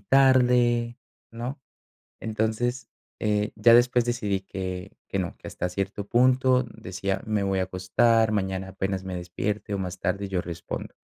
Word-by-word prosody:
tarde, 125 -1 +4 0.3
¿no?, 120 +4 -5 0.6
entonces, 110 +3 -1 0.3
eh, 105 -1 0
ya 115 - +6
después 120 0 +5
decidí 110 -5 -1
que 95 0 -5 0.2
que 100 - -2
no 90 -3 -3
que - - -9
hasta 90 - -3
cierto 100 +2 -3
punto 130 +2 +4
decía: 95 +1 -3
"Me 105 -2 0
voy 95 -1 0
a - - +2
acostar, 95 +5 +2
mañana 95 -2 -1
apenas 95 0 -3
me 95 -1 -5
despierte 100 +4 -3
o - - -1
más 90 -1 -4
tarde 100 +1 -1
yo 95 -2 0
respondo", 85 -1 -6
105 Hz, 150 wpm, -26 LUFS, 95-120 Hz, 0.6 s, ya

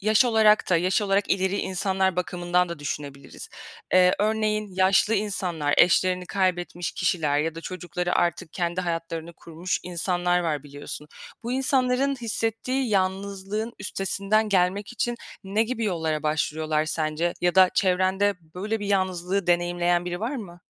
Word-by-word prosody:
yaş 215 +4 +4
olarak 220 -4 +4
da 180 - +5
yaş 185 +5 +1
olarak 200 0 +1
ileri 190 +1 +1
insanlar 190 -1 0
bakımından 180 0 0
da 170 -3 -6
düşünebiliriz. 140 -1 -7 0.5
Eee, 180 0 +6
örneğin 215 0 0
yaşlı 190 +3 +3
insanlar, 180 -8 -1
eşlerini 180 +1 +3
kaybetmiş 175 -3 -1
kişiler 160 -5 0
ya 160 +2 -1
da 165 - -7
çocukları 180 0 -3
artık 170 -2 -1
kendi 175 0 -1
hayatlarını 165 -1 -4
kurmuş 170 +3 -4
insanlar 180 0 0
var 155 -5 -1
biliyorsun. 145 +1 -9 0.3
Bu 235 - -3
insanların 265 0 +1
hissettiği 235 +3 -1
yalnızlığın 195 +3 -1
üstesinden 200 +2 0
gelmek 195 +3 +1
için 240 0 -2 0.3
ne 205 +3 +1
gibi 230 -1 -3
yollara 160 -5 -1
başvuruyorlar 155 0 0
sence 160 +2 -1
ya 175 0 +1
da 185 -1 +6
çevrende 190 +2 +2 0.2
böyle 210 +4 -3
bir 205 - -4
yalnızlığı 185 -1 0
deneyimleyen 175 0 +1
biri 175 0 -4
var 245 +6 -2
mı? 175 -6 -9
185 Hz, 140 wpm, -25 LUFS, 175-205 Hz, 0.5 s, Eee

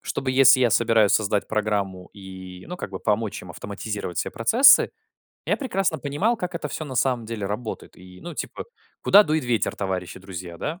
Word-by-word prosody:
чтобы, 130 -1 -3
если 135 0 +6
я 120 -3 +3
собираюсь 115 -3 +3
создать 105 -1 +1
программу 100 -4 -2
и, 95 -2 -11
ну, 180 - -6
как 100 - -7
бы 95 - -6
помочь 105 0 -1
им 90 - -11
автоматизировать 100 -1 -6
все - - -2
процессы 235 - +5 0.6
я - - 0
прекрасно 195 - -1
понимал, 150 - -1
как 180 -3 -4
это 150 -3 -4
всё 155 +2 -5
на 130 - -7
самом 125 -3 0
деле 110 -2 -5
работает. 105 +3 -6
И, 90 0 -14
ну, 175 -2 -7
типа, - - -6 0.4
куда 205 - +7
дует 155 -6 -1
ветер, 120 -2 0
товарищи 95 -2 -4
друзья, 90 -2 -8
да? 160 - -5
110 Hz, 190 wpm, -24 LUFS, 95-145 Hz, 0.6 s, куда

